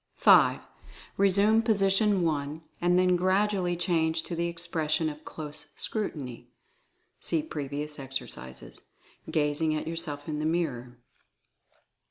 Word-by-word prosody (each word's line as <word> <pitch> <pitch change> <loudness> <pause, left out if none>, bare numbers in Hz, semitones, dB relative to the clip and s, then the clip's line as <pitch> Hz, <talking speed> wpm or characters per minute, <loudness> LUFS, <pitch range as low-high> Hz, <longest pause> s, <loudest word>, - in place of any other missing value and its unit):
5. - - +6 0.6
Resume 200 +3 +4
position 200 -3 +2
1, 150 -1 -2 0.2
and 175 +1 +3
then 180 0 +4
gradually 185 -1 +1
change 165 -2 +1
to 170 - -5
the 170 +1 0
expression 165 -2 -1
of 150 0 -10
Close 150 -1 -8
Scrutiny 145 - -4 0.7
(see 160 -2 -1
previous 150 0 -5
ex 135 0 -2
ercises), 65 - -9 0.5
gazing 155 +1 +1
at 155 - -3
yourself 160 -3 -3
in 150 -1 -3
the 155 - -2
mirror. 125 -8 -2
160 Hz, 120 wpm, -28 LUFS, 150-180 Hz, 0.7 s, 5